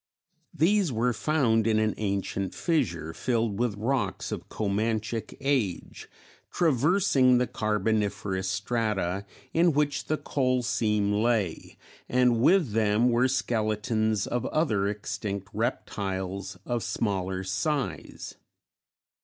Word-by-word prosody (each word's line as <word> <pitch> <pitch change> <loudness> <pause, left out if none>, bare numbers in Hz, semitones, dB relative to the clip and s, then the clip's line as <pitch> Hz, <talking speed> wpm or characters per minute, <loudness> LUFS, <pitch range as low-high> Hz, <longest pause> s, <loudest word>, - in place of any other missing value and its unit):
These 185 +1 +3
were 120 +1 +1
found 115 -3 +2
in 110 -1 +3
an 110 -1 +2
ancient 100 -2 -2
fissure 95 - -1
filled 115 -1 -1
with 120 -4 0
rocks 110 -3 -1
of - - -6
Comanchic 110 +2 -2
age, 135 -10 -2 0.4
traversing 145 -4 +3
the 125 - +2
Carboniferous 105 -3 -1
strata 100 -2 -1 0.3
in 170 0 +4
which 145 0 0
the 155 - 0
coal 130 -4 0
seam 105 -3 +1
lay, 105 -5 0 0.3
and 125 -2 +3
with 170 - +4
them 110 +2 +3
were 120 +2 +3
skeletons 110 -4 0
of 120 -1 -2
other 110 -11 +1
extinct 100 -1 -4
reptiles 100 -4 -3
of 120 -1 -1
smaller 95 -4 -2
size. 115 +9 -3
110 Hz, 110 wpm, -27 LUFS, 100-125 Hz, 0.4 s, in